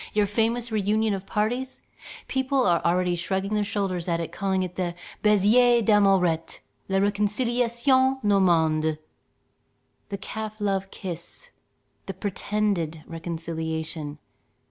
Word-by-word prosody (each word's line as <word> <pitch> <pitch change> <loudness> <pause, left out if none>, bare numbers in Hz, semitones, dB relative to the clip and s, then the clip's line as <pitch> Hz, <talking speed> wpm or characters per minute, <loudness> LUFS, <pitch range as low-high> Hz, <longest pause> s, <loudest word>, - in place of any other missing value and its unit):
Your 210 -1 +3
famous 230 +3 0
reunion 215 +1 +1
of 195 0 -5
parties, 245 +5 -2 0.4
people 265 0 +1
are 170 -2 +3
already 180 +1 +2
shrugging 190 +3 -2
their 210 -1 +2
shoulders 195 -4 -2
at 170 -1 0
and 165 - -4
calling 190 -2 0
it 180 -1 -5
the 175 -2 -2 0.3
"baiser 225 +4 +5
d'Amourette, 195 -6 +3 0.3
la 195 - +1
réconciliation 240 +6 +2
normande": 160 -6 +3 1.1
the 200 - -3
calf 215 +2 -6
love 195 -2 -1
kiss, 185 - -7 0.6
the - - -5
pretended 200 -6 -1
reconciliation. 160 -2 -4
200 Hz, 115 wpm, -25 LUFS, 175-220 Hz, 1.1 s, baiser